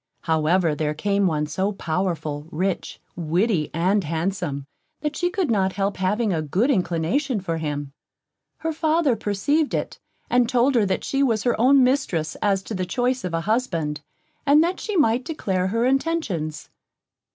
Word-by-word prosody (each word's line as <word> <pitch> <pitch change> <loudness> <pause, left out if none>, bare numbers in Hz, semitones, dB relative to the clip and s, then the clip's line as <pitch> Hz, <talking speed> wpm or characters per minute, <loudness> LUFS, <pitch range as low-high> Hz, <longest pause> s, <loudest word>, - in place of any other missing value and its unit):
However, 160 +1 +2
there 150 0 -1
came 200 +4 +1
one 150 -3 0
so 190 +7 -1
powerful, 160 -5 -2
rich, 180 +3 -2 0.2
witty 170 +1 0
and 185 +5 +1
handsome, 165 -3 -2 0.4
that 300 -1 -2
she 355 - 0
could 360 -6 -1
not 190 -3 +1
help 195 +1 -1
having 205 +3 +1
a 160 - 0
good 190 - +1
inclination 205 - 0
for 170 -4 -3
him. 145 -2 -4 0.6
Her 325 0 -2
father 310 -4 +2
perceived 280 +10 0
it, - - -3 0.3
and 245 -1 +2
told 250 +2 +3
her 225 -5 +3
that 190 - -1
she 275 - 0
was 230 -6 +2
her 240 -2 +2
own 265 +2 +6
mistress 250 - 0
as 195 -2 +1
to 220 - -6
the 185 -2 -2
choice 250 +7 -1
of 180 -2 -2
a 165 - 0
husband, 170 -8 -1 0.4
and 295 +2 +5
that 355 +2 -1
she 425 - -4
might 250 -5 +3
declare 190 - -1
her 230 +5 0
intentions. 250 - -1
195 Hz, 165 wpm, -23 LUFS, 165-255 Hz, 0.6 s, own